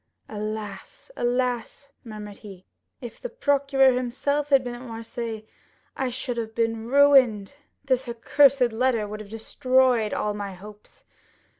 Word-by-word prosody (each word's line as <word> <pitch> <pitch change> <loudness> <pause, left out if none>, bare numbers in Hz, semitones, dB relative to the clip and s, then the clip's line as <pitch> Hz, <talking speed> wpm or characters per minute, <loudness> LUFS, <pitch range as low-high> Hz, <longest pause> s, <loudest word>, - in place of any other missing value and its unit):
"Alas, 215 - -7
alas," 250 +3 -2
murmured 210 -3 -9
he, 195 -4 -12 0.4
"if 240 -3 -9
the - - -5
procureur 280 - +3
himself 270 +4 -1
had 275 -2 +4
been 245 -1 -5
at 240 - -9
Marseilles 230 -2 -6 0.5
I 265 -1 -1
should 245 -1 -4
have 225 -1 -4
been 225 -1 -1
ruined. 265 -6 +4 0.3
This 260 -2 0
accursed 255 +1 +3
letter 230 -2 +1
would 210 +1 -7
have 215 -1 -10
destroyed 250 0 +1
all 210 - -1
my 200 -2 -6
hopes. 210 +3 -14
240 Hz, 135 wpm, -25 LUFS, 215-260 Hz, 0.5 s, had